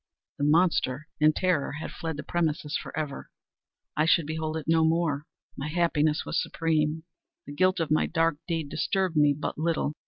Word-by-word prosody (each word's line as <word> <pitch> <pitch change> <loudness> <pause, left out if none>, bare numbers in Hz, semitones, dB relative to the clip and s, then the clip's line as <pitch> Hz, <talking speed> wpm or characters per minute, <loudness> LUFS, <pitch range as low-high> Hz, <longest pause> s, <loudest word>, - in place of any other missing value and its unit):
The 145 - +1
monster, 155 -3 +2
in 155 0 +6
terror, 170 -5 0
had 155 +2 -6
fled 160 -2 -5
the 150 - -5
premises 155 -3 -1
forever! 150 -3 -4 0.7
I 155 +1 +2
should 165 -1 +4
behold 155 +1 -3
it 155 - -6
no 160 0 +4
more! 160 -3 +1 0.3
My 140 - -4
happiness 155 -2 +1
was - - 0
supreme! 160 -1 0 0.4
The 145 - -8
guilt 185 +4 +2
of 160 -2 -1
my 155 - +3
dark 165 -2 +1
deed 165 -4 -2
disturbed 190 0 0
me 145 -1 +4
but 150 - -4
little. 160 -2 0
155 Hz, 175 wpm, -27 LUFS, 150-165 Hz, 0.7 s, in